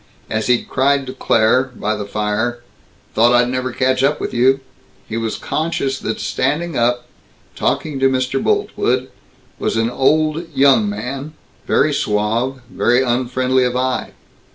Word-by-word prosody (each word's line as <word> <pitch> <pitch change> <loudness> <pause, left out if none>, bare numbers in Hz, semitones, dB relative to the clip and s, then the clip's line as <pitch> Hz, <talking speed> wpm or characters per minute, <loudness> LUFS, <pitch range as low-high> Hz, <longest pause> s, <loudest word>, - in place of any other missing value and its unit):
As 110 0 -1
he 125 -1 +3
cried 140 +1 +1
to 130 - -6
Claire, 125 0 +2
by 105 +1 -1
the 105 -1 -5
fire, 105 +4 -2 0.5
"Thought 120 +2 +4
I'd 120 0 +4
never 130 0 -2
catch 130 +1 +1
up 145 +2 +2
with - - -4
you," 130 +3 +3 0.5
he 110 - -5
was 115 -1 -2
conscious 150 -4 -2
that - - -3
standing 155 +6 -1
up, 120 +1 +1 0.5
talking 150 -4 -1
to 135 0 +4
Mr. 130 0 -1
Boltwood, - - 0 0.5
was - - -1
an 115 +1 +1
old 155 +5 +1
young 140 +11 +4
man, 140 -5 -5 0.3
very 150 - +3
suave, 115 +4 -1
very 125 +1 +2
unfriendly 130 +1 +1
of 125 0 0
eye. 130 0 -1
130 Hz, 150 wpm, -18 LUFS, 120-135 Hz, 0.5 s, Thought